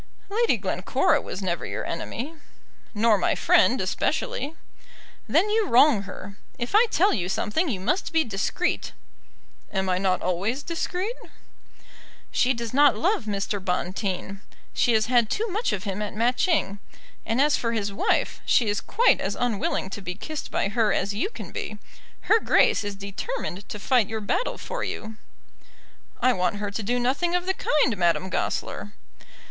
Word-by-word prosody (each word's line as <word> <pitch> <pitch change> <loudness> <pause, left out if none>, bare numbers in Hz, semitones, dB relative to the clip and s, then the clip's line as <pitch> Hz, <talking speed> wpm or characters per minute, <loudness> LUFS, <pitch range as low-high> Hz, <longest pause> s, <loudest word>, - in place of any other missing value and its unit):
"Lady 455 +3 +2
Glencora - - +1
was 195 - -6
never 175 -2 -1
your - - -4
enemy." 245 - -4 0.6
"Nor 215 -1 +4
my - - +1
friend, - - +4
especially." - - -1 0.7
"Then 415 - +3
you 435 -1 +2
wrong 250 - +5
her. 200 +2 -9 0.2
If 240 +7 -4
I 445 +4 +6
tell 390 +4 +3
you 180 -4 -1
something 315 - 0
you 205 -7 -2
must 240 - -1
be 325 -1 +3
discreet." 225 - -1 0.8
"Am 190 -1 -1
I 180 0 +1
not 185 -1 +1
always 200 +10 -1
discreet?" 360 +6 -2 1.2
"She 250 - +2
does 235 -2 -3
not 280 -5 +5
love 355 - +1
Mr. 200 -1 -2
Bonteen. 190 +1 -2 0.3
She 240 - +2
has 215 -1 +3
had 240 -2 +3
too 445 +3 -1
much 425 +6 -1
of 195 - -3
him 200 -1 -3
at 210 -1 -4
Matching. 235 - +1 0.4
And 225 +3 -1
as 290 +1 +4
for 230 - -1
his 205 -3 -2
wife, - - 0
she 235 - +3
is 205 - 0
quite 475 - +3
as - - -2
unwilling 215 -5 -1
to 205 - -5
be 180 -1 -5
kissed 310 +7 -6
by - - 0
her 220 0 +2
as 200 - 0
you 225 - -1
can - - -9
be. 215 - -5 0.4
Her 445 - +4
Grace - - +3
is 205 -1 -4
determined 200 - -5
to - - -5
fight 235 0 +2
your 220 0 -3
battle 215 - -1
for - - -5
you." 220 0 -5 1.0
"I 255 0 +4
want 180 +1 0
her 205 0 -3
to 200 - -3
do 240 +4 0
nothing 280 +9 +1
of 360 0 0
the 380 - +1
kind, 295 - +1
Madame 180 +1 +1
Goesler." 205 - -3
225 Hz, 170 wpm, -25 LUFS, 200-310 Hz, 1.2 s, I